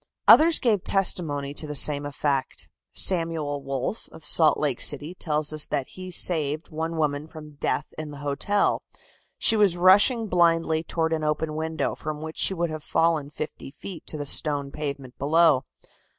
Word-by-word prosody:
Others 315 +6 +7
gave 215 -7 +1
testimony 150 -7 0
to 155 - -3
the 150 - -6
same 145 0 +5
effect. 140 -1 -3 0.2
Samuel 165 -5 0
Wolf, 135 - -4
of 160 - -12
Salt 160 -2 +4
Lake 140 -5 -2
City, 150 +4 -1
tells 155 -3 -2
us 155 -1 -1
that 135 - -3
he 185 0 -9
saved 155 -3 +2
one 160 +1 -4
woman 150 -1 -2
from 150 -2 -13
death 145 - -2
in 155 -1 -6
the 145 - -10
hotel. 200 +9 0 0.6
She - - +3
was 200 -5 +2
rushing 205 +6 +4
blindly 165 -4 +1
toward 165 0 -2
an 155 -1 -2
open 150 +1 -2
window, 160 0 -3
from 155 -1 -6
which 160 +1 -8
she 190 - +3
would 170 -2 -2
have 155 -1 -7
fallen 160 -4 0
fifty 155 -2 -7
feet 170 +5 -11
to 155 - -4
the 145 - -5
stone 140 -1 +2
pavement 140 -4 -6
below. 150 -2 +3
155 Hz, 170 wpm, -24 LUFS, 145-170 Hz, 0.6 s, Others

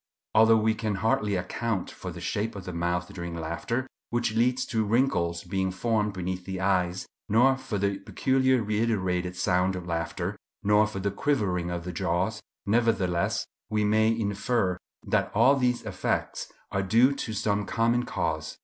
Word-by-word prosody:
Although 110 +1 +6
we 110 0 +2
can 110 -2 -2
hardly 105 0 +1
account 95 +2 -2
for 95 - -7
the 85 - -8
shape 105 +5 -2
of 95 -2 -7
the 90 - -5
mouth 85 +1 -1
during 85 -2 -5
laughter, 85 +10 -2 0.2
which 120 -2 0
leads 125 +3 +2
to 110 -2 0
wrinkles 100 -7 +1
being 95 +1 -1
formed 105 +2 0
beneath 90 -1 -3
the 95 0 -5
eyes, 95 -1 +1 0.2
nor 125 +5 +5
for 120 -5 -4
the 100 0 0
peculiar 130 +3 +2
reiterated 95 -5 0
sound 90 +1 +1
of 90 -1 -6
laughter, 85 -1 -2 0.3
nor 105 +1 +4
for 105 - -7
the 100 +1 -1
quivering 100 -8 0
of 85 -1 -3
the 90 - -4
jaws, 95 +5 -1 0.2
nevertheless 100 -5 +1 0.2
we 105 -1 +1
may 110 +1 +3
infer 110 -2 0 0.3
that - - +1
all 135 +2 +6
these 125 -2 +1
effects - - -2 0.2
are 95 - 0
due 115 +7 +4
to 140 -5 -4
some 105 0 0
common 115 +2 +2
cause. 80 -7 -3
100 Hz, 165 wpm, -27 LUFS, 90-115 Hz, 0.3 s, Although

